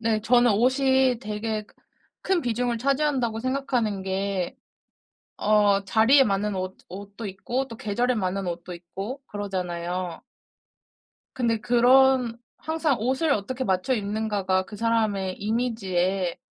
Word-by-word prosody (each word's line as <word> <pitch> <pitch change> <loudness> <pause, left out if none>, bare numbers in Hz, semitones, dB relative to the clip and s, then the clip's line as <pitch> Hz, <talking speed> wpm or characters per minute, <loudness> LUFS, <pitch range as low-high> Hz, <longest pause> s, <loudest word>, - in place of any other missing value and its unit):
네. 225 -1 +1
저는 240 +1 +4
옷이 260 +2 +3
되게 215 +1 -3
크 210 - -23 0.5
큰 380 -2 +3
비중을 240 -1 -1
차지한다고 270 -3 0
생각하는 245 -5 -1
게 190 -1 -2 0.8
어 205 -1 +3
자리에 230 +7 +5
맞는 205 -1 0
옷 185 0 -4
옷도 200 +4 -8
있고 240 +7 -3
또 230 - -9
계절에 240 +4 0
맞는 195 -3 -2
옷도 175 +1 -5
있고 195 +10 -7
그러잖아요. 180 -3 -4 1.1
근데 230 -3 0
그런 245 0 +4 0.2
항상 315 -4 0
옷을 265 +6 +1
어떻게 255 +4 -1
맞춰 190 +3 0
입는가가 205 -3 -1
그 210 - -10
사람의 210 -4 0
이미지에 195 -5 -1
220 Hz, 265 characters per minute, -25 LUFS, 195-250 Hz, 1.1 s, 자리에